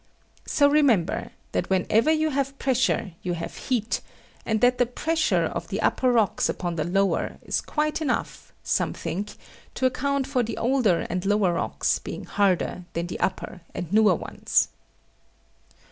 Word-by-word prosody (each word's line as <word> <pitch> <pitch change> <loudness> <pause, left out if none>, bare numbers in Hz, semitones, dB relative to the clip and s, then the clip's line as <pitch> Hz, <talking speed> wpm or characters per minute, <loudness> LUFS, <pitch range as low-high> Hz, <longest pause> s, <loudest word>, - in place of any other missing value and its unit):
So 285 - +4
remember 280 - +2 0.2
that - - -1
wherever 210 +8 +2
you 315 0 +1
have 275 0 -1
pressure 260 -7 +1
you 180 - -2
have 165 - -5
heat, 235 -4 -1 0.5
and 220 -1 +1
that 245 0 +4
the 245 - +3
pressure 320 +6 +1
of - - -4
the - - -3
upper 255 -1 +2
rocks 225 -4 +2
upon 175 -2 -2
the 155 - -1
lower 195 +4 0
is - - -1
quite 305 +1 -1
enough, 275 -5 -2
some - - 0
think, 200 +4 -4 0.4
to 260 - 0
account 275 +2 +1
for 265 -2 0
the 230 -1 -3
older 235 -8 +2
and 180 0 -2
lower 200 -3 +2
rocks - - 0
being - - -7
harder 185 -2 0
than 170 +1 -2
the 175 - -6
upper 185 -1 -2
and 180 +1 -5
newer 210 -4 +5
ones. - - 0
225 Hz, 160 wpm, -25 LUFS, 185-270 Hz, 0.5 s, newer